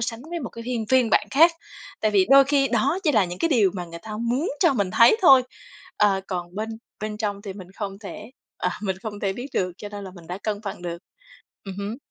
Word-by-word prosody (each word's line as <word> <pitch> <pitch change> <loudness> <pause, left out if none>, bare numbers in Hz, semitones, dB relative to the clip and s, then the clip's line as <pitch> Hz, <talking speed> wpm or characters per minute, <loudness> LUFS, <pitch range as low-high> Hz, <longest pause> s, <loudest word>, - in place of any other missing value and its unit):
sánh 230 0 -3
với 340 -1 -3
một 245 - -5
cái 230 0 -9
hiên 235 -3 -2
phiên 255 -3 +3
bản - - +3
khác. 330 +5 +6 0.5
Tại 215 - +2
vì 195 -2 +3
đôi 275 0 +8
khi 275 -1 +2
đó 270 - +1
chỉ 300 - +3
là 215 -5 +4
những 175 0 -6
cái 335 - +1
điều 220 - +4
mà 180 -2 -4
người 170 0 -9
ta 220 - -9
muốn 245 +8 0
cho - - +5
mình 200 -7 0
thấy 230 - +6
thôi, 265 -7 +8 0.5
ờ, 200 -2 +3
còn 175 -2 -4
bên 215 +2 -3 0.3
bên 215 0 -4
trong 205 -2 -3
thì 200 -3 -6
mình 190 -2 -10
không 195 -2 -5
thể, 210 +2 -9 0.3
à, 180 - 0
mình 190 -3 -1
không 205 -2 -6
thể 195 -1 0
biết 245 +6 -6
được, 180 -1 0
cho 205 - -7
nên 205 -1 -8
là 190 - -8
mình 170 -3 -13
đã 180 +3 -5
cân 210 -1 -2
bằng 200 -3 -6
được. 170 -1 -4 0.7
Ừm 195 -2 -7
hứm. 205 +3 -4
210 Hz, 255 wpm, -24 LUFS, 195-245 Hz, 0.7 s, đôi